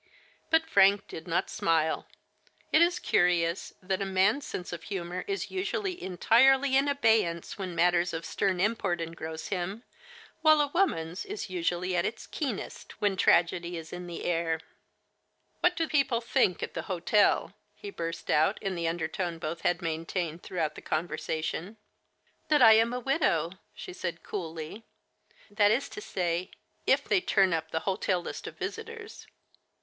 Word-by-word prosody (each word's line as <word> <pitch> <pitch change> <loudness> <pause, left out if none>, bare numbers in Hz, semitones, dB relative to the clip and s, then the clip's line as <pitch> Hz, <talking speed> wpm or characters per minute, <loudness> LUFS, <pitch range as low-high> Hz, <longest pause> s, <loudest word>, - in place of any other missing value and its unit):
* - - -29
" - - -39
But 320 0 +4
Frank 200 -9 +4
did 160 - -9
not 170 - 0
smile. 160 -1 0 0.6
It 310 - +5
is 345 +1 +4
curious 175 -1 +1
that 190 +1 -1
a - - +2
man's 195 +8 +2
sense 180 -1 -5
of 170 - -5
humor 180 -1 -4
is 400 0 -3
usually 380 -1 -2
entirely 265 +9 +4
in 275 +1 +4
abey 225 -6 +4
ance 170 +3 -6
when 185 -3 -4
matters 175 +1 +3
of 165 0 -5
stern 190 -2 0
import 195 -3 0
engross 160 -1 -6
him, 190 +4 -3 0.6
while 310 -1 +6
a 290 -1 +2
woman's 180 - 0
is 405 - -6
usually 180 +1 -1
at 175 - +2
its 225 +4 -4
keenest 265 - -5
when 205 -2 +1
tragedy 175 -1 +2
is 160 -1 -8
in 180 0 -6
the 170 - -6
air. 165 -2 0 0.5
'* - - -46
What 355 0 +3
do 325 -1 0
people 270 -6 +2
think 215 -5 +1
at - - -5
the 165 - -3
hotel? 190 +3 +2
" - - -44
he 410 - -8
burst 165 - -4
out 160 +7 +3
in 195 -2 -2
the 170 -2 -2
undertone 165 +1 -2
both 165 +1 -5
had 175 0 0
maintained 165 +1 -3
throughout 160 -4 -2
the - - -10
conversation. 160 +4 -3 0.4
" - - -41
That 295 -4 +5
I 225 -1 +10
am 225 +2 +4
a 250 - -2
widow," 240 - +1 0.2
she - - -8
said 175 -2 -5
coolly; 165 +2 -6 0.3
" - - -48 0.3
that 205 0 +4
is 235 +6 +1
to 405 - -8
say, 175 - -2 0.4
if - - +4
they 380 - +2
turn 190 - +3
up 160 0 -2
the 160 - -2
hotel 190 -1 0
list 175 - -7
of - - -9
visitors." 450 0 -7
185 Hz, 175 wpm, -29 LUFS, 170-235 Hz, 0.6 s, I